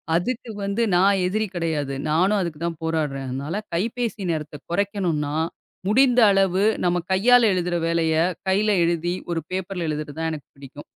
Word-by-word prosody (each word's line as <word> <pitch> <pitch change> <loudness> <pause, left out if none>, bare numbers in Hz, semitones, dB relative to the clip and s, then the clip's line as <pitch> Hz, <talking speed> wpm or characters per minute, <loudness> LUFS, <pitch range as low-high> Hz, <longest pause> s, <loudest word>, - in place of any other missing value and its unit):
அதுக்கு 240 +6 -2
வந்து 200 +4 0
நான் 195 +1 +4
எதிரி 215 +3 -1
கெடையாது. 155 -5 -2 0.2
நானும் 190 +6 +3
அதுக்கு 170 -4 -4
தான் 165 -2 -4
போராடுறேன். 150 -4 -1
அதனால, 140 +7 -4 0.2
கைப்பேசி 225 +3 -2
நேரத்தை 150 -2 -4
கொறைக்கணுனா, 175 -7 -1 0.5
முடிந்த 250 +2 +4
அளவு 195 0 +2 0.2
நம்ம 175 0 +2
கையால 245 +6 +5
எழுதுற 180 -1 -1
வேலையை 165 -1 +2 0.3
கைல 210 +3 +2
எழுதி, 170 +1 0 0.2
ஒரு 165 - 0
பேப்பர்ல 185 -2 -3
எழுதுறது 150 -1 -4
தான் 160 0 0
எனக்குப் 150 -3 -9
பிடிக்கும். 140 +1 -11
175 Hz, 150 wpm, -23 LUFS, 155-200 Hz, 0.5 s, கையால